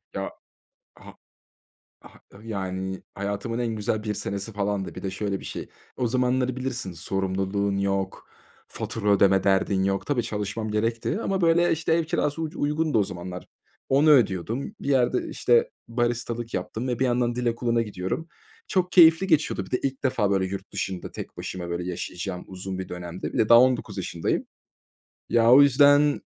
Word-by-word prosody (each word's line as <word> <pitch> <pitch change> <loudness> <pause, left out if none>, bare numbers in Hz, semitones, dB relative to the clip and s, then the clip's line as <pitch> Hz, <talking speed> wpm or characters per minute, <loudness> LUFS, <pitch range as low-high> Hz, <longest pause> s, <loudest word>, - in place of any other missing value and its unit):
Ya! - - -3 0.6
Ha - - -14 0.9
ha - - -17 0.2
Ih 115 - -12
yani, 95 -2 -4
hayatımın 100 +4 -3
en 115 -2 -1
güzel 105 +1 -1
1 105 -1 -2
senesi 100 +3 -4
falandı. 100 -4 -2
Bir - - -8
de 95 - -2
şöyle 100 0 -3
bir - - -12
şey, - - -6 0.3
o 125 - 0
zamanları 125 +1 +1
bilirsin. 125 -8 -3
Sorumluluğun 95 +3 -1
yok, 95 -1 -2 0.4
fatura 105 -2 -4
ödeme 95 -1 +4
derdin 95 0 +2
yok. 95 0 -1
Tabii, 130 -5 +1
çalışmam 105 0 -3
gerekti 115 - -1
ama, 190 -1 -1
böyle, 170 +1 +4
işte, 160 0 0
ev 165 -1 +1
kirası 155 0 -1
uc 155 - -5
uygundu 150 -3 +1
o 100 - +3
zamanlar. 90 -1 -7 0.4
Onu 145 +3 +4
ödüyordum. 115 - +2
Bir - - -5
yerde, 125 -2 +2
işte, 120 -1 +2 0.2
baristalık 120 0 -2
yaptım 110 +7 -3
ve 120 - -1
bir 130 - +2
yandan 120 -1 +1
dil 125 0 -3
okuluna 115 0 +1
gidiyorum. 105 - -4 0.4
Çok 180 -2 0
keyifli 165 +1 +7
geçiyordu. 150 - +1
Bir - - -15
de 125 - +1
ilk 135 -1 -2
defa, 105 -6 +1
böyle, 95 -1 +2
yurt 100 +1 -6
dışında 95 -2 -4
tek - - -8
başıma, 90 -2 -5
böyle, 85 +1 -3
yaşayacağım 90 +1 -5
uzun 95 0 -6
bir 95 - -5
dönemdi. 90 0 -6
Bir - - -3
de 110 - +3
daha 115 0 +9
19 125 -5 +1
yaşındayım. 85 -3 -2 0.8
Ya, 115 0 +4
o 140 - +9
yüzden 145 +1 +5
110 Hz, 170 wpm, -25 LUFS, 95-130 Hz, 0.9 s, daha